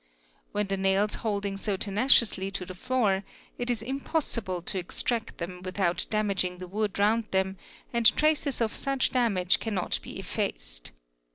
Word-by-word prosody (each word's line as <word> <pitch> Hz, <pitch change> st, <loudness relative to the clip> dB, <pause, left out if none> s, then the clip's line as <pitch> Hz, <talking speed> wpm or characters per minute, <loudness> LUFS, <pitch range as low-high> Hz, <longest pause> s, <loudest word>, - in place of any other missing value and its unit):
With 205 Hz, -1 st, -1 dB
the 195 Hz, -, 0 dB
nails 195 Hz, +2 st, +2 dB
holding 200 Hz, -2 st, -2 dB
so 200 Hz, -1 st, -1 dB
tenaciously 210 Hz, -1 st, +3 dB
to 195 Hz, -2 st, -4 dB
the 185 Hz, -, -7 dB
floor 205 Hz, -2 st, +1 dB, 0.4 s
it 245 Hz, 0 st, -2 dB
is 235 Hz, -2 st, 0 dB
Impossible 235 Hz, -, -2 dB
to 190 Hz, -, +2 dB
extract 225 Hz, +5 st, -1 dB
them 180 Hz, +1 st, -6 dB
without 185 Hz, -1 st, -1 dB
damaging 195 Hz, -4 st, 0 dB
the 185 Hz, -, -7 dB
wood 205 Hz, +2 st, -2 dB
round 215 Hz, +3 st, +3 dB
them 190 Hz, 0 st, 0 dB, 0.4 s
and 235 Hz, -1 st, +5 dB
t 300 Hz, -, +4 dB
aces 295 Hz, -4 st, +1 dB
of 220 Hz, -2 st, 0 dB
such 275 Hz, -1 st, +1 dB
damage 200 Hz, -8 st, +2 dB
cannot 205 Hz, -5 st, -2 dB
be -, -, -8 dB
effaced. -, -, -4 dB
200 Hz, 160 wpm, -28 LUFS, 185-230 Hz, 0.4 s, and